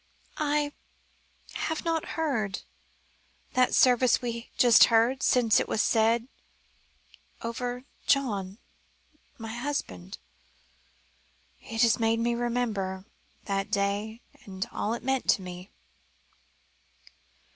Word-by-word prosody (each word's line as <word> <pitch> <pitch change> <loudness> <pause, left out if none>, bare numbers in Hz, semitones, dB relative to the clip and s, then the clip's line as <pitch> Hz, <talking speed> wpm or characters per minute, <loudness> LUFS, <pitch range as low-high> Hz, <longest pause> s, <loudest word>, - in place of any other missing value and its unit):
"I 295 -1 0 0.8
have 320 +1 -3
not 330 -1 0
heard 230 -12 -1 0.9
that 255 -1 +3
service 250 -1 +5
we 245 -1 -3 0.2
have - - -33
just 240 -3 +7
heard, 235 +3 +2
since 235 -4 +4
it - - -2
was - - -2
said 225 +2 +2 1.2
over 245 +2 -4 0.2
John 205 -8 +1 0.8
my 225 -1 -7
husband. 235 - -4 1.4
It 225 +1 -1
has 230 0 +3
made 225 0 +2
me 235 +1 +1
remember 225 -6 -2 0.4
that 195 -1 -2
day 205 +3 -1 0.2
and 190 +2 -5
all 220 +3 -2
it - - -9
meant 265 0 -1
to 190 - +3
me." 180 +1 -9
230 Hz, 105 wpm, -28 LUFS, 205-250 Hz, 1.4 s, just